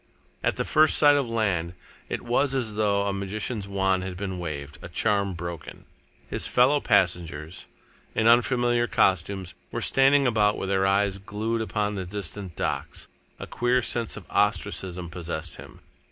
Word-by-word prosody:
At - - +1
the - - -2
first 155 0 +4
sight 145 -1 +6
of 140 -4 0
land, 95 -7 -1 0.3
it - - -3
was 135 +3 +1
as 120 -5 -1
though 100 -1 +1
a 100 - -1
magician's 100 +2 -3
wand 95 -1 +1
had 95 -1 -5
been 95 -2 -4
waved, 75 -4 -6
a - - -8
charm 100 -3 0
broken. 85 -2 -7 0.4
His - - -2
fellow 130 +4 +4
passengers, 90 - 0 0.5
in 110 - +1
unfamiliar 120 0 +3
costumes, 95 -1 +1 0.2
were - - -3
standing 135 +1 +4
about 105 -4 +2
with 95 - -3
their 95 0 +2
eyes 100 0 +1
glued 110 +3 -3
upon 105 -1 -1
the 95 -2 -4
distant 100 -1 -6
docks. - - -3 0.3
A - - -7
queer 120 0 +1
sense 115 -2 -2
of - - -10
ostracism 90 -2 0
possessed 85 -2 -5
him. - - -13
100 Hz, 160 wpm, -26 LUFS, 90-115 Hz, 0.5 s, sight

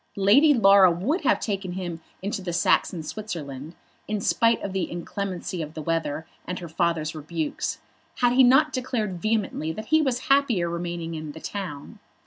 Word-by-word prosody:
Lady 220 +11 +6
Laura 195 -7 +7
would 200 - -1
have 285 - +2
taken 195 -4 -3
him 175 -3 -5 0.2
into 200 0 -2
the 180 -2 -4
Saxon 170 0 +1
Switzerland, 155 -6 -6 0.3
in 210 -1 -1
spite 230 +3 +2
of 195 - -4
the 190 -2 -1
inclemency 180 0 -4
of 155 +1 -7
the 155 - -5
weather 160 -1 -2 0.2
and 180 - -3
her 175 - -7
father's 160 -1 -1
rebukes, 155 0 -3 0.4
had 245 -1 +2
he 260 - +6
not 270 +4 +5
declared 225 -8 -2
vehemently 215 -8 -1
that 215 +7 -7
he 315 0 +5
was 260 -4 0
happier 270 -11 +2
remaining 170 -1 -4
in 155 -2 -6
the 160 - -9
town. 170 -7 -6
185 Hz, 170 wpm, -25 LUFS, 165-220 Hz, 0.4 s, Laura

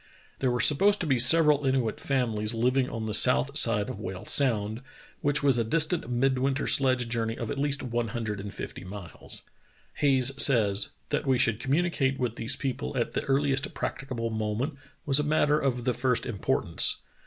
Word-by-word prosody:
There 130 - 0
were 125 0 -1
supposed 200 +11 +3
to - - -2
be 135 -5 0
several 150 +3 +4
Inuit 130 -5 -1
families 115 -5 -2
liv 125 +3 0
ing 130 -2 0
on 115 -1 -6
the 110 - -4
south 130 +4 +5
side 115 -8 +4
of - - -7
Whale 95 -2 -7
Sound, 110 -4 +1 0.4
which 145 +1 -1
was 135 -4 +2
dis 150 +8 +1
tant 170 +1 -3
a - - -12
midwinter 130 +2 -1
sledge 130 -3 +2
journey 115 -1 -3
of 115 - -5
at 140 - -5
least 140 -1 -2
one 120 -1 -3
hundred 110 -3 -5
and 100 +1 -7
fifty - - -8
miles. 95 -1 -10 0.5
Hayes 135 -2 +4
says: 105 -7 +3 0.2
"That - - -3
we 130 -1 +2
should 115 -2 0
com 135 - -3
municate 150 -5 0
with 125 -4 -3
these 115 - 0
people 135 0 -5
at 120 - -2
the - - -2
earliest 135 0 -1
practicable 120 -4 -5
moment 110 +7 -3 0.3
was 140 0 +4
a - - 0
matter 150 0 +1
of 125 -4 -2
the 125 0 0
first 125 +1 -1
importance. 100 -5 0
125 Hz, 190 wpm, -26 LUFS, 115-140 Hz, 0.5 s, south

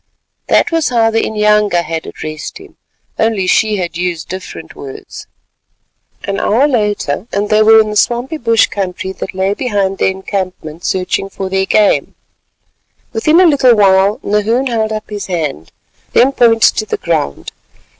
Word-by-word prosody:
That - - +2
was 330 -2 +1
how 230 -2 +2
the 225 0 +1
inyanga 210 -4 +1
had 165 -1 -5
addressed 155 -1 -7
him—only 225 - -4
she 205 -1 +1
used 175 -1 -3
different 185 -3 -8
words. 135 -1 -10 1.0
An 200 0 -3
hour 250 +7 +2
later, 210 - -1
and 205 +1 -1
they 215 0 +4
were 220 +1 +7
in 215 -1 +1
the - - -5
swampy 245 +8 0
bush 230 -5 +3
country 190 -1 -4
that 190 - -7
lay 190 +1 0
behind 205 -5 -2
the - - +2
encampment 185 -4 -4
searching 190 +1 -1
for 190 -1 -6
their 190 0 0
game. 210 -2 +2 1.0
Within 275 +8 +1
a - - +7
very 350 - +6
little 260 -4 +4
while 195 0 +3
Nahoon 215 +5 0
held 220 -2 -1
up 215 0 -4
his 205 -2 -6
hand, 150 - -4 0.4
then 260 +3 +4
pointed 230 -4 +4
to 215 - -2
the - - -2
ground. 160 - -2
205 Hz, 155 wpm, -14 LUFS, 190-225 Hz, 1.0 s, were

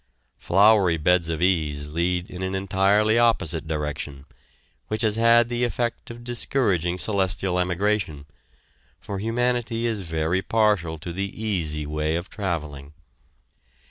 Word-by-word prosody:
Flowery 100 -3 +4
beds 85 +1 +2
of 80 +1 -2
ease 75 -5 0
lead 85 +3 -1
in 90 - -8
an 95 0 -2
entirely 100 +3 +2
opposite 85 -9 +1
direction, 75 -2 -4 0.6
which 110 +2 -1
has 110 -1 +2
had 115 +1 +5
the 120 0 -2
effect 120 -1 -2
of 120 0 -9
discouraging 105 - 0
celestial 95 -2 0
emigration, 90 -4 -1 0.7
for 100 -1 -6
humanity 120 +1 -1
is 110 -3 -1
very 80 +1 -1
partial 105 -7 +1
to 85 +2 -7
the 100 +2 -3
easy 80 -9 -2
way 75 +1 -1
of 85 +2 -5
traveling. 75 -8 -4
95 Hz, 130 wpm, -24 LUFS, 80-110 Hz, 0.7 s, had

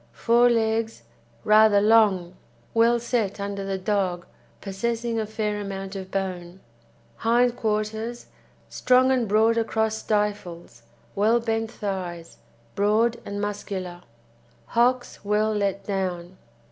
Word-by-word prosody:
FORE 240 +1 +3
LEGS 225 - 0 0.4
Rather 215 -1 +5
long, 205 -5 +3 0.4
well 230 +1 +4
set 230 -4 -2
under 200 0 -4
the 195 0 -3
dog, 185 -3 -1 0.3
possessing 230 +3 -2
a 215 - -2
fair 210 -1 -2
amount 195 0 -6
of 190 -1 -6
bone. 185 -2 -4 0.6
HIND 240 +1 +2
QUARTERS 220 +2 -3 0.4
Strong 255 +1 +3
and 250 -3 +1
broad 220 +3 +3
across 220 -1 0
stifles, 205 - -3 0.3
well 220 +4 +3
bent 225 -1 -2
thighs, 185 -6 -6 0.3
broad 220 +3 +2
and 200 0 -5
muscular; 195 -4 -5 0.6
hocks 245 0 0
well 210 +1 +1
let 200 -1 -1
down. 185 -2 -4
210 Hz, 115 wpm, -24 LUFS, 195-230 Hz, 0.6 s, Rather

